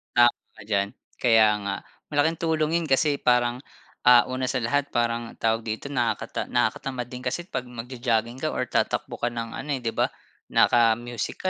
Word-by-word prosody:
Tama 120 0 +7 0.2
ka 110 - -13
diyan. 100 -1 0 0.3
Kaya 115 -3 +5 0.2
nga. 100 -1 -1 0.4
Malaking 160 +3 +2
tulong 160 -2 0
yun 165 - -3
kasi 140 +1 +2
parang, 125 0 +2 0.5
ah, 125 -1 +9
una 130 0 -1
sa 125 - -1
lahat 145 +4 +1
parang 120 0 0
tawag 115 0 0
dito 110 +6 -4
nakakata 120 -6 -1
nakakatamad 125 -3 -1
din 125 0 -8
kasi 135 +7 -2
pag 125 - -4
magjo-jogging 120 -1 -2
ka - - -2
or - - -1
tatakbo - - -1
ka 120 - 0
ng 115 -1 -4
ano, 145 - -6
eh, 130 - -4
'di 115 - -1
ba? - - +1 0.5
Naka-music 120 0 +2
120 Hz, 170 wpm, -25 LUFS, 115-130 Hz, 0.5 s, ah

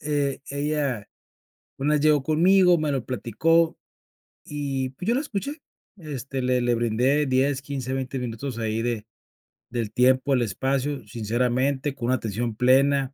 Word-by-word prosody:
e 145 -2 -1
ella 140 -6 -2 0.7
una 145 +3 +1
vez 150 - +2
llegó 150 -2 +4
conmigo, 175 +4 +4
me 155 -1 -1
lo 135 -4 -2
platicó, 160 +8 +1 0.7
y, 135 -3 -3
pues, 155 +9 -7
yo 235 - +3
la 265 - +1
escuché. 285 +3 -4 0.4
Este, 135 - -5
le 125 0 +2
le 120 0 +2
brindé 120 +6 +1
10, 130 +1 +1
15, 135 -2 -4
20 135 0 -3
minutos 125 +1 -5
ahí 110 0 -1
de 115 -3 -2 0.7
del 115 -3 -2
tiempo, 130 +2 +3
el 125 - +3
espacio, 135 +4 -2
sinceramente, 125 +6 0
con 130 -4 -5
una 130 - +3
atención 115 0 -3
plena, 135 +3 +3
135 Hz, 150 wpm, -25 LUFS, 120-145 Hz, 0.7 s, llegó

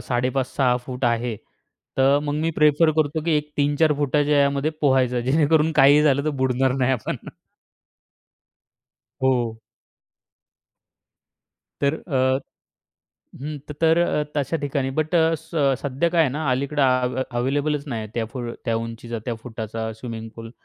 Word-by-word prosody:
5.5-6 125 0 0
फूट 130 0 -4
आहे. 120 -1 0 0.6
त - - +1 0.2
मग 145 -1 -2
मी 165 +1 0
प्रिफर 150 +2 +4
करतो, 155 0 +1
की 170 - 0
एक 150 0 -3
3-4 145 +2 +2
फुटाच्या 145 0 +2
यामध्ये 140 +2 +1
पोहायचं, 130 -3 +2
जेणेकरून 155 +4 +2
काहीही 145 +1 +6
झालं 140 -1 +2
तर 155 - +1
बुडणार 130 0 +2
नाही 130 0 +2
आपण. 120 -4 -2 2.1
हो. 120 -4 +1 2.2
तर 140 +1 +2
अ 130 -2 +2 1.0
हं 150 +2 -5
तर 160 +2 +2 0.4
तशा 145 +3 0
ठिकाणी. 135 -1 -1
बट 155 0 0 0.3
स 160 - -16 0.3
सध्या 140 +4 0
काय 170 -1 +2
आहे 145 - +1
ना 150 +2 -3
अलीकडे 140 +3 0
आ, 135 - +5 0.2
आव 125 0 -2 0.2
अवेलेबलच 145 +3 0
नाही 115 -5 -4
त्या 115 -1 -1
फोर 120 -3 -4
त्या 115 -2 0
उंचीचा, 115 +1 -5
त्या 120 - -1
फुटाचा 110 -1 -5
स्विमिंग 115 0 -7
पूल. 115 0 -8
135 Hz, 135 wpm, -23 LUFS, 125-150 Hz, 2.2 s, काहीही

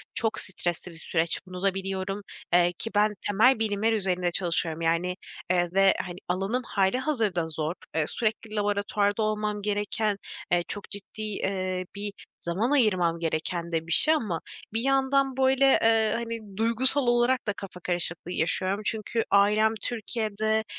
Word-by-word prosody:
çok 225 -1 0
stresli 175 -1 -2
bir 165 - -12
süreç 165 0 -1
bunu 180 0 -7
da 195 -1 +2
biliyorum, 195 +1 -3 0.3
eee, 175 0 +5
ki 225 - -1
ben 210 0 +3
temel 220 +4 +4
bilimler 220 +1 +1
üzerinde 180 -4 0
çalışıyorum, 165 -2 0
yani, 170 +2 +1 0.4
eee, 175 -1 +2
ve, 195 0 +5
hani, 180 -1 -7
alanım 195 +8 -1
hâlihazırda 210 - 0
zor. 160 +1 -2 0.2
Eee, 155 - +2
sürekli 220 -1 -2
laboratuvarda 205 0 0
olmam 210 -1 -1
gereken, 205 0 0 0.3
eee, 175 -1 +3
çok 205 - -5
ciddi, 205 +2 -8
eee, 185 -3 -2
bir 205 0 -4 0.3
zaman 200 +10 -1
ayırmam 185 -11 +3
gereken 170 +1 -2
de 165 0 -1
bir - - -6
şey 310 - +6
ama 210 - -1 0.3
bir 225 - 0
yandan, 270 0 +2
böyle, 265 +1 +4 0.2
eee, 225 -1 +4
hani, 230 -4 -5
duygusal 245 +4 +3
olarak 240 +1 +2
da 205 - +1
kafa 195 -2 -9
karışıklığı 175 0 -3
yaşıyorum. 185 +4 0
Çünkü 225 +1 -1
ailem 210 +2 +4
Türkiye'de, 220 -2 -1
205 Hz, 150 wpm, -27 LUFS, 180-225 Hz, 0.4 s, şey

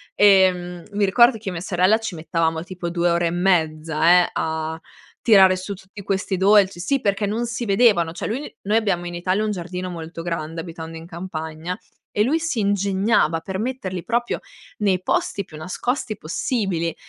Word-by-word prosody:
e, 195 -2 +6
mhmm, 175 -1 -8
mi 205 0 0
ricordo 235 +6 +5
che 215 - -19
io - - -1
e - - -5
mia 165 - -5
sorella 185 +3 +3
ci 225 -5 -5
mettevamo 160 0 -1
tipo 180 -1 -5
2 175 0 +1
ore 170 0 +1
e - - -1
mezza, 165 -1 +3
eh, - - -3
a 160 0 -2 0.4
tirare 190 -5 +6
su 185 +2 -5
tutti 195 +1 -12
questi 195 -1 -1
dolci 195 -1 +4
sì, 270 +10 0
perché 200 0 0
non 225 +4 -1
si 235 +1 -3
vedevano. 200 -5 +3
Cioè 170 - -5
lui 255 +8 -5
noi 215 +2 +3
abbiamo 195 -6 0
in 175 - -6
Italia 185 +4 0
un 215 - -1
giardino 180 -1 -5
molto 165 -1 -7
grande, 165 -1 -4
abitando 165 -1 -8
in 165 +1 -10
campagna, 165 -1 -5 0.4
e 205 - 0
lui 295 +8 +1
si 325 -7 -2
ingegnava 200 -3 +2
per 190 +3 -5
metterli 200 -7 -3
proprio 240 +1 -1 0.4
nei 195 -4 +1
posti 200 +2 -1
più 155 - -12
nascosti 215 - -3
possibili, 170 - -2
185 Hz, 185 wpm, -22 LUFS, 170-205 Hz, 0.4 s, e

